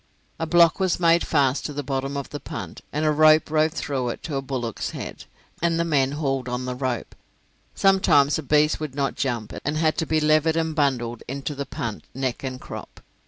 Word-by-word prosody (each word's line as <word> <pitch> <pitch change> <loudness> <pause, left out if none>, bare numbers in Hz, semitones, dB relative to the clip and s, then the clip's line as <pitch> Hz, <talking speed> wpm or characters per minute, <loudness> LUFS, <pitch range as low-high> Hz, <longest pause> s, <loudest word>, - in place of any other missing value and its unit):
A 165 - -2
block 170 +2 +5
was 185 -2 +1
made 170 -1 +4
fast 140 -3 +2
to 150 - -7
the 145 +1 -3
bottom 135 +1 -2
of 140 - -5
the 145 - -5
punt, 115 - -7
and 150 +2 -1
a 155 - +4
rope 155 0 +5
rove 155 0 +2
through 135 -7 -2
it - - -6
to 155 - -4
a 135 - 0
bullock's 125 -5 -3
head, - - -7 0.4
and 170 0 +1
the - - +3
men 140 -4 +2
hauled 135 -4 -1
on 125 +1 -3
the 125 - -2
rope. 125 -2 -3 0.6
Sometimes 160 -7 +4
a - - -3
beast 150 +1 +2
would 150 -4 -5
not 140 -1 0
jump, 120 -5 -2
and 150 +1 -1
had 155 0 +1
to 160 - -1
be 155 - +2
levered 155 +1 +3
and 160 -1 0
bundled 125 -6 0
into 140 +3 -4
the 140 -1 -5
punt 115 -3 -5
neck 130 -1 -2
and 130 -1 -4
crop. - - -9
145 Hz, 210 wpm, -24 LUFS, 130-155 Hz, 0.6 s, block